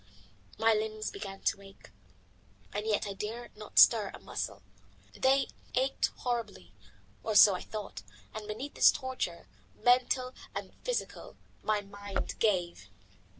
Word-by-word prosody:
My 225 +1 +4
limbs 215 0 -2
began 195 -1 -7
to 200 - 0
ache, 195 0 -15 0.8
and 210 +2 -3
yet 210 -2 +1
I 200 - -4
dared 225 +4 -6
not 210 0 -11
stir 215 -4 +7
a - - -9
muscle. - - -5 0.5
They 270 +1 +3 0.3
ached 265 +2 +2
horribly, 225 - -3 0.5
or 220 - -2
so 205 -1 +9
I 180 - -3
thought, 210 - -6 0.3
and 215 -1 -6
beneath 255 +7 -5
this - - +7
torture, 260 -11 -4 0.3
mental 255 +1 +2 0.2
and - - -5
physical, - - -4 0.2
my 215 -1 +1
mind 200 0 -5
gave. 175 - 0
215 Hz, 135 wpm, -31 LUFS, 200-240 Hz, 0.8 s, so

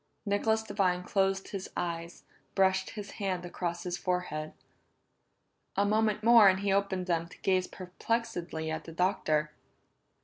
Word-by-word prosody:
Nicholas 220 +2 +1
Devine 185 -4 0
closed 195 0 0
his 195 -2 -5
eyes, 170 -1 -4 0.3
brushed 190 -1 +3
his 200 -1 -6
hand 185 -3 -1
across 175 -1 -3
his 175 -1 -3
forehead. 180 -4 -2 1.2
A 200 - +3
moment 215 0 +1
more 230 -3 +8
and 190 0 +1
he 200 -1 +1
opened 195 -2 0
them 170 -2 0
to - - -15
gaze 185 -1 +2
perplexedly 180 -4 -3
at 160 - -4
the 165 - -9
Doctor. 160 -4 +1
190 Hz, 140 wpm, -30 LUFS, 175-200 Hz, 1.2 s, more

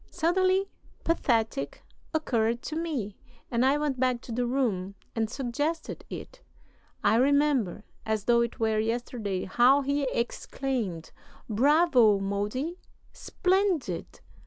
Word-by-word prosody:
Suddenly 370 +3 +2 0.4
'Pathetic' 225 - 0 0.3
occurred 235 -7 0
to 305 - -4
me, 285 -12 -3 0.3
and 235 0 +2
I 270 +2 +4
went 295 -4 -1
back 255 -1 +2
to 245 - -9
the 245 +1 0
room 205 -7 -1 0.2
and 225 -1 0
suggested 290 +6 -3
it. - - -8 0.6
I 210 +2 +4
remember, 270 -7 +2 0.2
as 220 -2 -1
though 235 +1 +4
it 235 -1 -2
were 220 -1 +1
yesterday, 220 -4 -2
how 245 +8 +4
he 280 0 0
exclaimed: 235 -7 -3 0.4
'Bravo, 255 -2 +4
Modi, 210 - -2 0.3
splendid! 375 -3 -1
245 Hz, 115 wpm, -28 LUFS, 220-295 Hz, 0.6 s, I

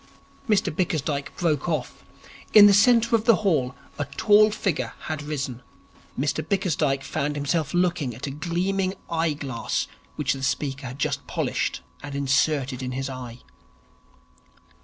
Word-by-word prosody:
Mr 205 -7 +2
Bickersdyke 150 -5 -1
broke 160 -2 0
off. 155 -5 -3 0.5
In 210 -1 +11
the 205 - +7
centre 230 +2 +5
of 220 -1 0
the 230 -2 +6
hall 135 -9 +1 0.2
a 145 - 0
tall 210 +9 +4
figure 145 - -2
had 155 -1 -4
risen. 140 -5 -4 0.6
Mr 145 +2 0
Bickersdyke 155 -6 0
found 145 +1 -2
himself 145 +1 -1
looking 175 -8 0
at 125 - -6
a 140 - -4
gleaming 185 +5 -1 0.2
eye 165 -1 +1
glass 135 -5 -3 0.3
which - - 0
the 135 - -7
speaker 135 0 -2
had 130 +1 -8
just 140 - -2
polished - - -2 0.2
and 145 -1 -7
inserted 140 -1 +1
in 125 0 -4
his 135 +1 -3
eye. 125 -2 -8
150 Hz, 145 wpm, -25 LUFS, 135-180 Hz, 0.6 s, In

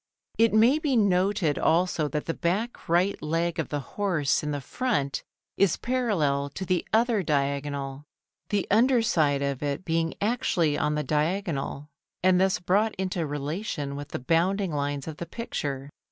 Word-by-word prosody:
It 230 0 +5
may 235 +7 +5
be 295 -4 0
noted 190 -5 +2
also 165 -2 +2
that 150 0 -3
the 165 - -1
back 200 +9 -2
right 175 +3 +2
leg 165 +2 -1
of 160 - -2
the 145 -1 -2
horse 170 -4 0
in 150 - -3
the 145 -1 -2
front 140 - -1 0.4
is 195 -4 +3
parallel 175 - 0
to 190 - -4
the 180 -1 +1
other 225 -1 +3
diagonal, 140 -2 -2 0.4
the 205 -2 0
under 235 +3 +4
side 145 -9 +2
of 140 -2 -2
it 145 +4 -2
being 165 -1 0
actually 190 -8 +1
on 150 0 0
the 150 - -1
diagonal 150 -2 -1 0.4
and 185 0 +4
thus 190 0 +3
brought 205 +5 +1
into 185 -4 -2
relation 145 0 -3
with 145 0 -6
the - - -4
bounding 175 +7 +1
lines 145 0 -2
of 155 -2 -6
the 170 - -6
picture. 145 - -4
165 Hz, 165 wpm, -27 LUFS, 145-200 Hz, 0.4 s, It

